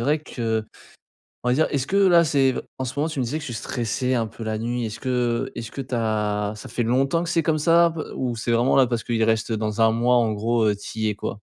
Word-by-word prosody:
vrai 145 +6 +2
que 115 -6 -2 0.8
on - - +1
va 125 - +3
dire, 160 - +3
est-ce 140 -2 -1
que 195 - 0
là, 185 -4 +6
c'est 135 -4 +2 0.2
en 130 - -2
ce 125 0 -5
moment 150 +3 0
tu 155 -3 -6
me - - +1
disais 135 +6 -2
que - - -8
tu 120 - -5
stressais 120 +2 -2
un 115 -3 0
peu 115 - -9
la 110 -1 -2
nuit, 120 +1 -2
est-ce 110 0 -7
que 125 -2 0
est-ce 115 -1 -6
que - - -5
tu 130 -1 -9
as 105 -2 0
ça 105 - -10
fait 120 - -2
longtemps 135 +8 +1
que 170 - -5
c'est 165 -1 +2
comme 155 -1 +1
ça 170 +2 +5
un - - +1
peu? 160 -1 -6
Ou 125 -2 -2
c'est 115 +1 -2
vraiment 120 +3 +3
là 135 - +6
parce 120 -2 -2
qu'il 115 -2 0
reste, 110 0 +1
heu, - - 0
dans 110 0 -2
1 115 0 +5
mois 120 +2 +2
en 115 -2 +2
gros, 115 +2 +1
heu, 105 - +1
tu 105 +2 -8
y 110 - +1
es 105 - -1
quoi? 105 - -5
120 Hz, 285 wpm, -23 LUFS, 110-135 Hz, 0.8 s, là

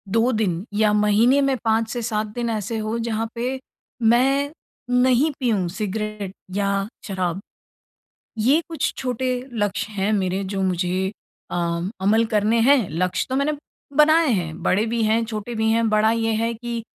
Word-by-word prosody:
2 230 +3 +3
दिन 200 -5 -1
या 210 0 +3
महीने 210 +6 +4
में 275 -1 +2
5 225 0 +2
से 240 - -3
7 220 -2 -1
दिन 240 0 -2
ऐसे 220 0 -2
हो, 215 +1 -2
जहाँ 225 -1 -2
पे 250 +3 -2 0.4
मैं 270 +5 +3 0.5
नहीं 260 +4 +3
पियूँ 220 -9 +1
सिगरेट 210 0 -4 0.2
या 200 0 0 0.2
शराब। 185 -2 -2 1.0
ये 265 +9 +3
कुछ 325 - -1
छोटे 255 0 -1 0.2
लक्ष्य 205 -1 -2
हैं 200 +1 0
मेरे 190 -1 0
जो 195 - -1
मुझे 185 +1 0 0.4
अ, - - -2 0.5
अमल 220 +4 +3
करने 215 +2 +3
हैं, 255 -3 +4
लक्ष्य 180 +4 -1
तो 260 - -1
मैंने 280 +3 +1 0.4
बनाए 310 +2 +5
हैं 175 -5 -2
बड़े 205 +4 +2
भी 230 0 -1
हैं, 220 +2 +2
छोटे 220 +1 -5
भी 220 0 +1
हैं। 230 0 +2
बड़ा 215 +1 +3
ये 225 0 0
है 230 +2 0
कि 235 0 -5
220 Hz, 165 wpm, -22 LUFS, 200-240 Hz, 1.0 s, बनाए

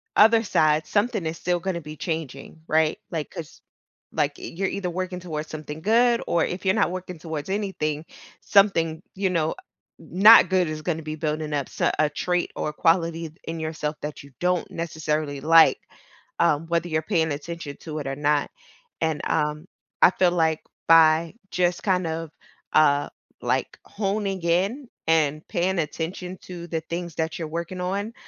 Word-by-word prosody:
other 225 +1 +6
side, 155 -6 +2
something 205 -4 0
is 160 - -4
still 175 0 0
gonna 175 -1 -3
be 155 0 -9
changing, 160 -2 -5
right, 155 0 +2
like, 160 -3 -3
'cause 160 -3 -9 0.5
Like, 145 -2 0
eh, - - -11
you're 195 +2 0
either 195 -2 -3
working 185 0 -3
towards 155 -3 -5
something 155 0 -7
good 235 +4 +3
or 170 - +2
if 185 +2 -5
you're 190 +1 +3
not 205 -5 +2
working 180 -1 -6
towards 160 0 -5
anything 165 -7 -2 0.4
something, 165 -5 +3
you 195 0 0
know, 160 -3 +1
uh, - - -3 0.5
n - - -15
not 225 -1 +10
good 185 -2 +2
is 155 0 -5
gonna 160 -2 -1
be 155 0 -4
building 155 0 -2
up 140 -2 0
s - - -10 0.2
a 155 - +4
trait 180 +3 -1
or - - -2
a - - -7
quality 165 0 +1
d 155 - -23
in 165 0 -4
yourself 155 -1 -3
that 150 0 -5
you 140 - -15
don't 180 0 0
necessarily 155 -3 -2
like, 165 +1 +6 0.6
um, 150 +3 +2
whether 170 +1 0
you're 155 -1 +1
paying 160 -4 +1
attention 150 0 -6
to 155 -2 -7
it 145 - -5
or 135 - -2
not. 145 0 +1 0.5
And, 160 -2 0
um, 150 +2 -1 0.3
I - - +8
feel 185 -1 +3
like 160 -2 +1 0.3
by 160 0 +6 0.2
just 175 -1 +1
kind 185 -3 +1
of, 160 0 -4 0.4
uh, 145 -2 +4 0.3
like, - - -1
honing 195 -2 -2
in 195 +11 0 0.2
and 155 -2 +2
paying 180 +1 0
attention 175 +4 -4
to 175 -2 -8
the 165 -1 -2
things 170 0 -5
that 160 +1 -2
you're 165 - -3
working 170 +3 -5
on, 200 +5 -2
165 Hz, 180 wpm, -24 LUFS, 155-180 Hz, 0.6 s, not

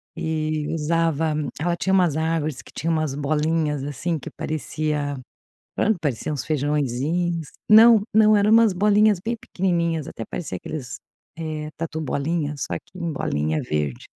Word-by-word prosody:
e 155 -1 -2
usava, 160 -1 0 0.3
ela 175 +2 0
tinha 190 - -1
umas 175 -6 +3
árvores 160 -3 -1
que - - -16
tinham 165 +4 -1
umas 155 -4 -1
bolinhas, 150 0 0
assim, 150 +4 -2
que - - -8
parecia, 150 -2 -2 0.6
pronto, 215 -3 +2
parecia 145 -1 -2
uns 140 -5 -2
feijãozinhos, 150 +3 -1 0.2
não, 220 0 +8
não, 215 0 +6
eram 205 +1 +3
umas 225 -1 +6
bolinhas 210 +1 +3
bem 235 +1 -1
pequenininhas, 170 -7 -1
até 115 - -6
parecia 135 - -5
aqueles, 130 - -6 0.4
eh, 155 -2 -4
tatu 160 -1 -4
bolinha, 150 +1 -1
só 115 -10 -3
que 185 - -15
em 170 -2 -2
bolinha 75 - -1
verde, 75 -4 -3
155 Hz, 150 wpm, -23 LUFS, 145-175 Hz, 0.6 s, não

